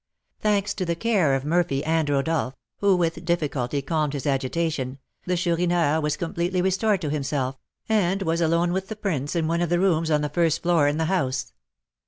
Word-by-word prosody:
Thanks 205 Hz, -1 st, +1 dB
to 190 Hz, -, -3 dB
the 170 Hz, -1 st, -1 dB
care 185 Hz, -8 st, +2 dB
of 135 Hz, +1 st, -3 dB
Murphy 155 Hz, -3 st, +1 dB
and 160 Hz, -1 st, +1 dB
Rodolph, 140 Hz, -1 st, 0 dB, 0.2 s
who 200 Hz, -1 st, +4 dB
with 165 Hz, -1 st, -1 dB
difficulty 145 Hz, -6 st, -1 dB
calmed 150 Hz, -1 st, 0 dB
his 140 Hz, -3 st, -4 dB
agitation, 135 Hz, 0 st, -1 dB, 0.3 s
the 180 Hz, 0 st, +1 dB
Chourineur 170 Hz, -3 st, +1 dB
was 150 Hz, 0 st, -1 dB
completely 175 Hz, +2 st, -1 dB
restored 190 Hz, +2 st, +1 dB
to 150 Hz, -4 st, -2 dB
himself, 135 Hz, -3 st, -2 dB, 0.3 s
and 195 Hz, -3 st, +1 dB
was 165 Hz, -1 st, 0 dB
alone 170 Hz, +1 st, +2 dB
with 190 Hz, +1 st, -2 dB
the 220 Hz, -, -5 dB
prince 165 Hz, -8 st, -2 dB
in 165 Hz, -2 st, +1 dB
one 170 Hz, +1 st, 0 dB
of 175 Hz, -, 0 dB
the 175 Hz, 0 st, +2 dB
rooms 165 Hz, -4 st, +2 dB
on 150 Hz, -1 st, +2 dB
the 150 Hz, -, -1 dB
first 165 Hz, +1 st, +1 dB
floor 170 Hz, -4 st, +3 dB
in 145 Hz, +1 st, 0 dB
the 160 Hz, -, 0 dB
house. 135 Hz, -8 st, -1 dB
165 Hz, 195 wpm, -24 LUFS, 145-180 Hz, 0.3 s, who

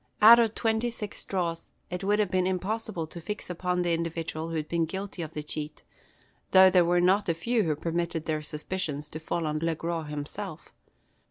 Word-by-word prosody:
Out 230 Hz, +3 st, +10 dB
of 225 Hz, -2 st, +2 dB
twenty 225 Hz, +1 st, +1 dB
six 210 Hz, -3 st, -6 dB
draws 170 Hz, -3 st, -3 dB, 0.2 s
it 180 Hz, +2 st, -4 dB
would 205 Hz, +2 st, +2 dB
have 210 Hz, -4 st, +1 dB
been 185 Hz, -1 st, +2 dB
impossible 190 Hz, -1 st, -2 dB
to 170 Hz, +2 st, -9 dB
fix 210 Hz, +1 st, -5 dB
upon 180 Hz, 0 st, -1 dB
the 175 Hz, -1 st, +1 dB
individual 165 Hz, -1 st, -3 dB
who 165 Hz, -, -4 dB
had 155 Hz, -1 st, -2 dB
been 170 Hz, 0 st, +1 dB
guilty 190 Hz, +2 st, -5 dB
of 160 Hz, -1 st, -6 dB
the 150 Hz, -, -3 dB
cheat, 150 Hz, 0 st, -5 dB, 0.7 s
though 190 Hz, 0 st, +9 dB
there 180 Hz, -1 st, +6 dB
were 175 Hz, +1 st, +3 dB
not 190 Hz, +2 st, +3 dB
a 165 Hz, -, +2 dB
few 230 Hz, +8 st, +1 dB
who 160 Hz, -6 st, +1 dB
permitted 165 Hz, +1 st, -2 dB
their 155 Hz, -1 st, -1 dB
suspicions 150 Hz, -1 st, -4 dB
to 155 Hz, -, -5 dB
fall 165 Hz, +1 st, -2 dB
on 155 Hz, 0 st, -1 dB
Le 165 Hz, 0 st, 0 dB
Gros 165 Hz, -1 st, -3 dB
himself. 145 Hz, -1 st, -6 dB
170 Hz, 200 wpm, -28 LUFS, 160-190 Hz, 0.7 s, Out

